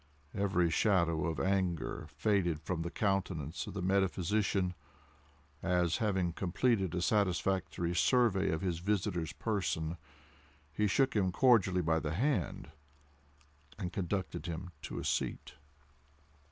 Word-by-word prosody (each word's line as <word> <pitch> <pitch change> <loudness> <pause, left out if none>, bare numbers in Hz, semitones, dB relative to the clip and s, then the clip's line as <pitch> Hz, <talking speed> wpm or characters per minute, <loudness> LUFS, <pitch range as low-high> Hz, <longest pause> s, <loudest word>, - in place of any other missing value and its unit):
Every 90 -4 +1
shadow 85 -4 +2
of 80 -4 -2
anger 90 -4 -1
faded 95 -7 +1
from 85 +1 -2
the 85 - -3
countenance 90 -6 -1
of 100 - -7
the 95 - -3
metaphysician, 95 0 +1 0.9
as, 90 -3 +1
having 95 -6 0
completed 95 0 0
a 90 - -1
satisfactory 95 -3 0
survey 105 +1 +3
of 80 0 -1
his 90 -3 -1
visitor's 90 -4 -1
person, 90 -6 -2 0.8
he 105 +4 +1
shook 130 +6 +2
him 95 -3 +2
cordially 95 -6 +4
by 80 0 +2
the 80 0 -3
hand, 130 - -1 1.1
and 90 0 -4
conducted 90 -4 -3
him 90 +2 -5
to - - -6
a - - -4
seat. - - -2
90 Hz, 125 wpm, -33 LUFS, 85-100 Hz, 1.1 s, cordially